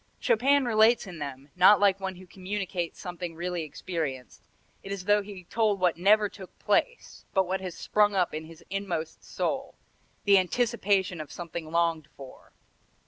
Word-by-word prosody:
Chopin 275 +4 +3
relates 225 0 +4
in 180 -4 -9
them, 140 -1 -7
not 185 +3 +7
like 195 -1 +3
one 190 -1 -4
who 185 +1 -13
communicates 185 -1 -4
something 175 -2 -6
really 175 +1 -3
experienced; 150 -4 -5 0.3
it 195 - -8
is 200 -1 -3
as - - -15
though 205 +1 +4
he 200 -2 -10
told 210 +1 0
what 180 -2 +2
never 210 +4 +4
took 195 -2 -13
place, - - -1
but 190 -1 +4
what 190 +1 -2
has 185 -3 -6
sprung 210 -1 +2
up 180 -2 +1
in 155 +1 -5
his 165 +1 -14
inmost 180 -5 -4
soul, - - -3 0.5
the 200 -1 +6
anticipation 195 -3 0
of 150 - -9
something 170 -2 -7
longed 165 -2 0
for. 135 -2 -13
185 Hz, 170 wpm, -28 LUFS, 170-205 Hz, 0.5 s, not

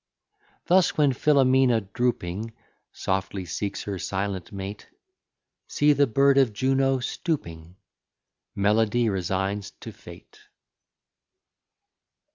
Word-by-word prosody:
Thus 185 0 +3
when 145 -3 +3
Philomela 130 -3 +3
drooping 115 -3 -2 0.4
Softly 95 0 -3
seeks 100 +4 -4
her 100 -2 -5
silent 95 -1 -4
mate, 100 +1 -7 0.8
See 150 0 +3
the 140 0 +3
bird 140 +4 +4
of 125 -5 +2
Juno 135 +3 +1
stooping; 90 - -4 0.8
Melody 110 +3 +2
resigns 95 +1 -2
to - - -8
fate. - - -15
110 Hz, 90 wpm, -25 LUFS, 95-135 Hz, 0.8 s, bird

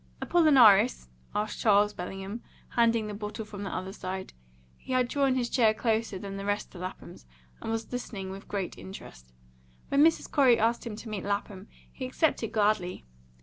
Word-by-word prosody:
"Apollinaris?" 250 - +5 0.3
asked 210 0 -2
Charles 210 -1 +4
Bellingham, 195 +5 -6 0.3
handing 230 -2 +2
the 210 - -5
bottle 210 +1 -5
from 205 -1 -9
the 200 - -4
other 185 +1 -4
side. 190 -1 -6 0.4
He 260 - -7
had 255 -1 +3
drawn 275 0 +1
his 245 -2 0
chair 225 -4 +3
closer 220 -3 0
than 195 +1 -6
the 195 - -5
rest 205 +1 -2
to 180 - -11
Lapham's, 180 - -8 0.3
and - - -5
was 225 0 -3
listening 205 -6 -5
with 195 +1 -9
great 195 -3 -4
interest. - - -11 0.6
When 280 +1 +4
Mrs. 325 0 +2
Corey 260 -5 +5
asked 230 +2 +1
him 220 - -5
to 225 +1 -9
meet 210 -3 -4
Lapham, 200 0 -3 0.3
he 255 - -5
accepted 255 -4 0
gladly. 205 - 0
210 Hz, 175 wpm, -28 LUFS, 195-240 Hz, 0.6 s, Apollinaris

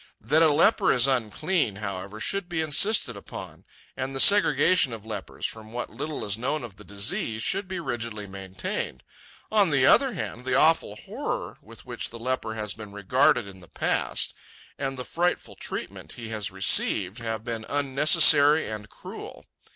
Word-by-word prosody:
That 150 +10 +2
a 160 - +6
leper 145 +3 +4
is 125 -1 +4
unclean, 135 - 0
however, 100 0 -6
should 195 - -2
be 170 -2 -2
insisted 200 +8 +2
upon; - - -10 0.3
and 135 +1 -4
the - - -3
segregation 185 - +5
of 110 -2 -8
lepers, 105 -4 -6
from 110 0 -6
what 120 - -4
little 155 -1 -4
is 100 +1 -2
known 135 +3 -2
of 105 -5 -9
the 105 - -12
disease, 105 +2 -1
should 195 - 0
be 185 -1 -4
rigidly 115 -8 -4
maintained. 95 -9 -5 0.5
On 205 -4 +4
the 135 -3 +3
other 265 - +5
hand, 120 - -5
the 130 0 0
awful 155 -7 +3
horror - - -5
with - - -15
which - - -6
the 115 - -9
leper 115 -2 -3
has 105 -2 -4
been 105 -1 -10
regarded 105 +3 +2
in 95 -1 -12
the 85 - -16
past, - - 0 0.4
and 135 -1 -4
the 125 - -5
frightful 175 +1 -1
treatment - - -6
he 115 -2 -8
has 110 -2 -3
received, 95 +2 +2
have 115 -2 -4
been 115 -2 -4
unnecessary 145 +2 +5
and 105 -1 -7
cruel. - - -10
120 Hz, 170 wpm, -26 LUFS, 105-150 Hz, 0.5 s, a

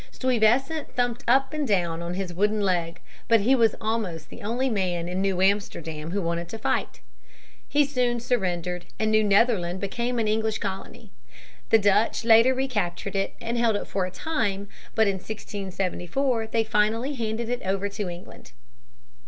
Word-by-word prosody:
Stuyvesant 260 +5 +1
thumped 245 -1 0
up 265 +4 +3
and 300 -2 -1
down 170 -5 0
on 170 +1 -4
his 185 -2 -4
wooden 210 +4 +1
leg. 170 -3 0 0.3
But 230 -2 +5
he 245 +6 +4
was 230 -4 +4
almost 215 -8 -3
the - - -10
only 240 +5 -1
man 180 -7 -1
in 180 +2 -2
New 190 -1 +1
Amsterdam 165 -6 -1
who 195 +2 -1
wanted 170 0 -2
to 225 - -6
fight. 220 - -2 0.7
He 290 0 +4
soon 250 -3 0
surrendered, 180 -7 -1
and 220 0 +1
New 215 0 +4
Netherland 200 -4 +2
became 235 +5 -2
an 225 -2 +1
English 220 0 0
colony. 190 0 -6 0.6
The 225 - +7
Dutch 210 +2 +2
later 230 +3 +6
recaptured 205 -8 -2
it 195 0 -1
and 235 +1 -2
held 230 -2 +3
it - - -2
for 190 -2 -1
a - - -5
time; 200 - -2 0.3
but 220 -1 +4
in 195 -1 +1
1674 205 +4 -2
they 225 0 +1
finally 220 +5 +1
handed 225 -2 -3
it 245 +1 -2
over 195 +1 0
to 200 -1 -4
England. 175 - -11
210 Hz, 170 wpm, -25 LUFS, 185-235 Hz, 0.7 s, The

